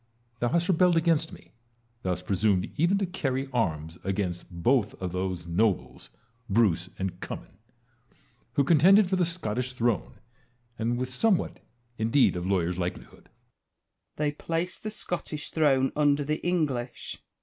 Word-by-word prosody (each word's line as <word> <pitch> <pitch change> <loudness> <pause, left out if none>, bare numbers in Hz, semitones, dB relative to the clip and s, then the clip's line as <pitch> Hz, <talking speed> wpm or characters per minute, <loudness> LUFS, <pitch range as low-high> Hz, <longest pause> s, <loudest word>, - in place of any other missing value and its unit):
Thou 120 - +1
hast 170 +3 +1
rebelled 180 -1 +4
against 165 -1 +2
me; - - -14 0.5
thou 95 - -2
hast 90 0 -2
presumed 95 -1 +1
even 175 +6 +3
to 200 - 0
carry 135 -7 -2
arms 80 -8 -1
against 95 -2 -2
both 105 +6 +1
of 90 -2 -3
those 90 -1 -3
nobles, 90 - 0 0.4
Bruce 95 -5 +2
and 95 -1 -3
Oummin, - - -8 0.9
who 140 +2 +3
contended 180 +7 +6
for 190 - +1
the 180 -1 +2
Scottish 130 -7 -2
throne, 120 -5 -1 0.6
and 115 +2 0
with 130 +1 -3
somewhat 195 - +1 0.4
indeed 115 +3 +3
of 90 +1 -3
lawyer's 90 -2 0
likelihood. 90 0 -5
Wallace. - - -39 0.8
They 150 -1 0
placed 165 +4 -3
the 215 - -4
Scottish 170 -7 -5
throne 135 -4 +3
under 145 -1 +3
the 150 +2 -2
English. 140 -9 -2
125 Hz, 145 wpm, -28 LUFS, -, 0.9 s, contended